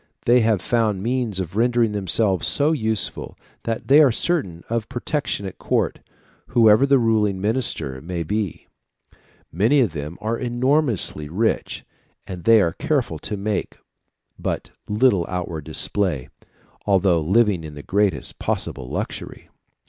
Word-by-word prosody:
They 120 +1 +5
have 110 -5 +1
found 110 -5 0
means 120 -4 -1
of 95 0 -5
rendering 120 0 +2
themselves 100 -1 +1
so 150 +2 +2
useful, 110 -8 -1 0.3
that 115 -1 -3
they 145 +3 +7
are 140 -4 +5
certain 105 - -1
of 115 -2 -2
protection 135 -4 -2
at 95 - -8
court, - - 0 0.5
whoever 115 +2 +5
the 140 0 +5
ruling 110 -5 +1
minister 105 - -2
may 85 +2 -4
be. 100 +2 -3 0.9
Many 110 - +3
of 115 -11 +2
them 75 +2 -6
are 110 +2 -2
enormously 120 - +1
rich, 110 +7 -1 0.4
but 90 -2 -8
they 115 -2 +6
are 85 -1 0
careful 125 - -1
to 105 - -4
make 100 0 -3 0.6
but - - -3 0.2
little 105 -3 +3
outward 85 -4 -4
display, 90 -10 -1 0.6
although 95 -4 +3
living 95 +1 +2
in 75 -1 -8
the 75 - -9
greatest 100 -8 0
possible 65 -2 -3
luxury." - - -6
105 Hz, 140 wpm, -22 LUFS, 90-120 Hz, 0.9 s, they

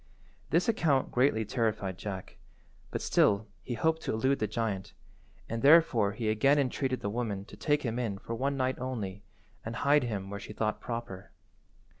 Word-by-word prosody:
This 170 +3 +2
account 155 - +2
greatly 125 -3 +2
terrified 105 -5 -1
Jack, 95 -3 -6 0.5
but - - -4
still 100 +1 +3 0.2
he 120 - -4
hoped 160 +8 +1
to - - -2
elude 130 +5 +1
the 110 - 0
giant, 105 -2 -3 0.5
and 115 0 -3
therefore 140 -9 +5
he 110 0 -3
again 135 +7 +4
entreated 130 -1 0
the 100 - -2
woman 105 -4 -3
to - - -12
take 145 -1 +1
him 120 -1 -2
in 110 -5 -2
for 115 - -6
one 135 +4 -1
night 130 0 0
only, 105 -7 -4 0.4
and 110 +1 -5
hide 145 +1 +3
him 100 -4 -4
where 100 - -4
she 105 - -8
thought 110 0 -1
proper. 115 -6 -6
115 Hz, 175 wpm, -30 LUFS, 105-135 Hz, 0.5 s, therefore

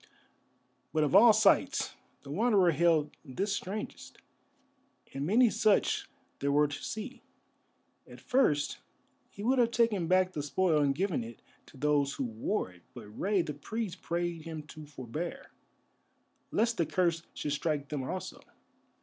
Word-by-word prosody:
But 155 -1 +2
of 150 - 0
all 225 +4 +9
sights 215 -1 +3 0.3
the 140 - -9
Wanderer 200 -1 +3
held 160 -1 +2
this 195 +9 -2
strangest, 205 +3 -6 1.0
and 140 +2 -3
many 230 +4 +5
such 215 -2 +2 0.3
there 140 +1 0
were 150 +1 +4
to 145 0 -7
see. 230 +5 -6 0.9
At - - -12
first 150 - +1 0.5
he 200 - -9
would 255 +3 +2
have 235 -1 +4
taken 230 -7 +1
back 185 +1 +3
the 155 - -4
spoil 155 +2 +1
and 140 -1 +2
given 180 - -1
it 115 0 -11 0.2
to - - -16
those 145 0 +1
who 135 - -2
wore 115 - -2
it, 90 0 -19
but 105 - -10
Rei 190 - 0
the 150 -2 -5
Priest 215 +7 -5
prayed 170 -1 -2
him 160 -1 -7
to 155 -1 -10
forbear, 145 +4 -6 1.0
lest 230 +2 +1
the 170 - +1
curse 170 -3 +1
should 145 - -3
strike 150 -1 -2
them 145 -2 -3
also. 185 +8 -5
165 Hz, 150 wpm, -30 LUFS, 145-205 Hz, 1.0 s, all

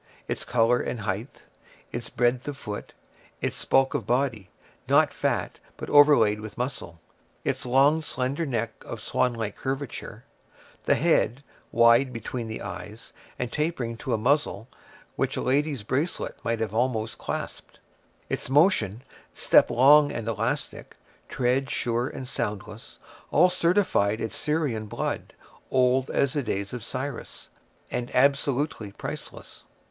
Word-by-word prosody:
Its - - -3
color 120 0 +3
and 120 - -3
height; 105 +5 -4 0.5
its 120 -1 -5
breadth 125 +2 +1
of 145 -1 -4
foot; 105 -6 -6 0.5
its - - -3
bulk 135 0 +3
of - - -2
body, 120 -6 0 0.4
not - - +4
fat, - - -1 0.2
but - - -6
overlaid 145 -8 +6
with 105 0 -9
muscle; 120 -10 -4 0.4
its - - -2
long, 140 +5 +4
slender 140 +1 -2
neck, 115 -6 -1
of 115 - -7
swanlike 115 -2 -1
curvature; 135 0 -5 0.6
the - - +4
head, 130 +5 +2 0.3
wide 115 +3 +5
between 115 0 -5
the 110 - -6
eyes, 110 +2 -8 0.2
and 125 -1 -3
tapering 150 -7 -2
to 130 +3 -5
a 115 - +2
muzzle 125 -2 +1 0.5
which - - 0
a - - -1
lady's 140 -2 0
bracelet 140 - -2
might 115 -1 -1
have 110 -2 -2
almost 115 -2 -1
clasped; - - -5 0.5
its - - -3
motion, 130 - +3 0.3
step - - +5
long 145 +4 +6
and 115 -1 -5
elastic, 115 +6 -3 0.3
tread 130 +2 0
sure 120 +1 0
and 130 - -7
soundless—all 115 - -2
certified 170 - +2
its 115 - -4
Syrian 145 -9 -1
blood, - - -4 0.3
old 130 0 +2
as 140 -1 +1
the 145 - 0
days 100 -4 -3
of 125 -3 -5
Cyrus, 130 +2 -6 0.4
and 120 0 -3
absolutely 140 -3 +1
priceless. - - -8
125 Hz, 135 wpm, -26 LUFS, 115-140 Hz, 0.6 s, overlaid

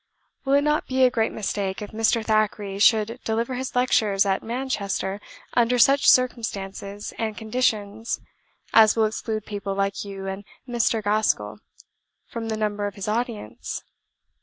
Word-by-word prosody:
"Will 270 - +1
it 285 - +4
not 300 0 +1
be 260 0 +2
a 250 - +5
great 225 -2 +1
mistake, 195 -2 -3
if 210 - -7
Mr. 225 +1 +1
Thackeray 210 -2 0
should 220 +2 +4
deliver 230 +3 -1
his 255 +1 -4
lectures 215 -6 +3
at 195 -1 +1
Manchester 210 -5 -3 0.3
under 245 +1 +3
such 275 +3 +5
circumstances 205 -5 0
and 220 -2 -2
conditions 220 -1 -1 0.5
as 220 -1 +7
will 225 -1 +3
exclude 215 0 -3
people 200 -1 -4
like 195 0 -1
you 195 -1 -7
and 195 +1 -5 0.2
Mr. 235 -2 +1
Gaskell 205 - 0 0.7
from 230 -1 -6
the 220 - -2
number 205 -1 -1
of 205 - -7
his 200 - -6
audience? 220 - -3
215 Hz, 150 wpm, -24 LUFS, 200-235 Hz, 0.7 s, as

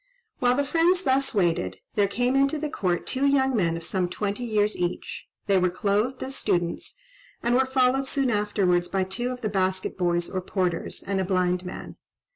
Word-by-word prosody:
While 245 0 +3
the 285 +1 +1
friends 340 +5 +2
thus 270 -4 +1
waited, 165 - +1 0.2
there 205 -1 +3
came 245 +5 0
into 275 +3 +3
the 300 0 -3
court 180 -3 -1
two 275 +1 0
young 265 -2 +3
men 165 -6 +1
of 165 - -8
some 180 +1 -1
twenty 205 +5 -3
years 215 -2 +1
each; 175 0 -4 0.2
they 195 -2 +3
were 180 0 +2
clothed 210 +7 0
as 270 +1 -5
students, 175 - -1 0.5
and 240 - +2
were 260 +1 +3
followed 260 0 +2
soon 270 -2 +1
afterwards 200 -4 +1
by 190 -1 0
two 225 +7 -3
of 250 -1 -5
the 215 - -1
basket 190 -1 -1
boys 175 -1 +1
or 185 - -3
porters, 180 -2 -2
and 195 -1 -1
a - - +1
blind 180 -1 0
man. 180 - -8
205 Hz, 195 wpm, -25 LUFS, 180-260 Hz, 0.5 s, While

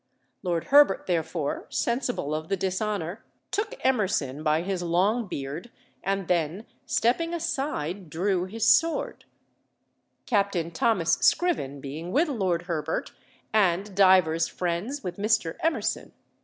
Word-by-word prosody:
Lord 170 -2 -1
Herbert 285 -9 +6
therefore, 160 -3 -2
sensible 240 - -1
of 155 +1 -4
the 195 - +1
dishonour, 190 0 -2 0.3
took 450 +4 -2
Emerson 185 - +1
by 155 +1 +1
his 190 -1 -2
long 195 +7 +1
beard, 145 +5 -5 0.3
and 195 -1 -1
then, 175 +4 0 0.2
stepping 330 +9 +1
aside, 265 - -3
drew 180 +3 0
his 225 +4 -2
sword; 330 +7 +2 1.0
Captain 200 -7 0
Thomas 220 -7 +2
Scriven 145 - +2
being 155 +6 -6
with 305 - +2
Lord 185 -9 0
Herbert, 160 -3 -3 0.4
and 195 -1 +2
divers 185 -4 +5
friends 185 +11 -3
with 180 -1 -5
Mr. 210 -5 +1
Emerson. 325 0 -1
190 Hz, 120 wpm, -26 LUFS, 165-225 Hz, 1.0 s, Herbert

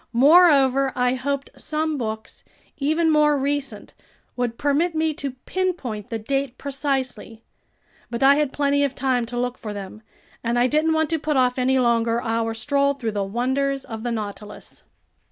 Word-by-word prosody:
Moreover, 275 -1 +5
I 250 0 +2
hoped 275 +2 -3
some 310 0 -2
books 220 -2 -5 0.3
even 315 +3 +1
more 300 -1 +4
recent 280 0 -3 0.4
would 240 -2 -2
permit 305 +4 +1
me 315 0 +1
to 280 -2 -5
pinpoint 335 - -3
the 230 - -2
date 270 +3 -2
precisely; 265 -5 -3 0.7
but 235 +2 -2
I 275 +1 +7
had 295 -2 +1
plenty 285 0 +1
of 275 -1 -1
time 255 -3 0
to 240 +1 -6
look 245 0 -2
for 210 -2 -6
them, 200 +2 -8 0.4
and 235 +1 0
I 240 - +4
didn't 305 +4 +2
want 315 -1 0
to 325 - +1
put 300 -1 -1
off 250 0 +2
any 260 +1 +2
longer 235 -2 +2
our 225 -1 -1
stroll 280 +4 +1
through 235 -5 -3
the 205 -1 -1
wonders 265 +6 -1
of 225 -1 -7
the 240 +1 -3
Nautilus. 210 -1 -7
265 Hz, 170 wpm, -23 LUFS, 235-285 Hz, 0.7 s, I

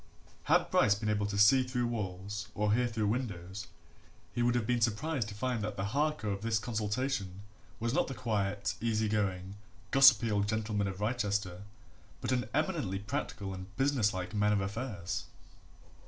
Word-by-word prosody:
Had - - +3
Bryce 100 -1 +4
been 105 +1 -2
able 105 -1 +1
to 100 0 -3
see 105 +6 +7
through 125 -1 -1
walls 100 -2 -4
or 105 0 +2
hear 125 +2 +2
through 110 -2 -1
windows, 100 -5 -3 0.7
he 120 - -1
would 120 0 +3
have 120 -3 +1
been 120 0 +1
surprised 120 +3 0
to 105 - -7
find 125 +1 -1
that 105 -1 -4
the 95 - -1
Harker 145 -7 0
of 100 0 -3
this 115 0 +1
consultation 110 -2 -2 0.4
was 115 +1 -1
not - - +2
the 135 - -5
quiet, 105 -3 -1
easy 110 -1 +1
going, 100 -2 -1 0.3
gossipy 130 -5 +7
old 100 -1 +1
gentleman 105 -2 -1
of 95 0 -5
Wrychester, 100 -4 -1 0.5
but - - -2
an 120 -3 0
eminently 150 - 0
practical 105 -3 -4
and 95 +1 -9
business 135 -6 +2
like 90 +1 -5
man 105 0 +2
of 100 - +1
affairs. 100 -3 -4
105 Hz, 170 wpm, -32 LUFS, 100-120 Hz, 0.7 s, see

